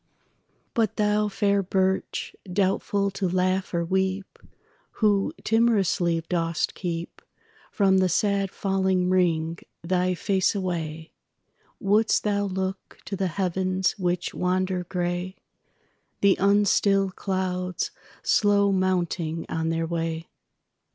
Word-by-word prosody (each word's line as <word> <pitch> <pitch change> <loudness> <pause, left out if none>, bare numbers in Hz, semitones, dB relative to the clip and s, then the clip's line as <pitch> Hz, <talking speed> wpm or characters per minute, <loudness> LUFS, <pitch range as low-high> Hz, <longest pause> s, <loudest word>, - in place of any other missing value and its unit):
But 225 -4 +1
thou, 210 0 +2
fair 200 0 +1
birch, 190 0 -1 0.2
doubtful 200 +1 +1
to 190 -1 -2
laugh 185 +1 0
or 170 -1 0
weep, 190 +2 -1 0.5
Who 205 -3 +2
timorously 195 -7 +2
dost 165 -2 -1
keepFrom 190 +2 -2
the 185 -1 +3
sad 195 +2 +1
fallen 190 -2 0
ring 165 -3 +1 0.2
thy 180 +1 +1
face 190 +2 +1
away; 165 -4 -3 0.7
Wouldst 210 +3 +2
thou 205 -1 +1
look 190 0 -4
to 195 - -4
the 190 0 0
heavens 185 +1 0
which 180 -1 -1
wander 185 0 0
grey, 175 +1 -2 0.9
The 200 -1 +5
unstilled 195 -1 +3
clouds, 185 -2 -2 0.3
slow 200 -1 +3
mounting 175 -3 0
on 160 0 -1
their 165 0 0
way? 165 -1 -3
185 Hz, 105 wpm, -25 LUFS, 175-195 Hz, 0.9 s, The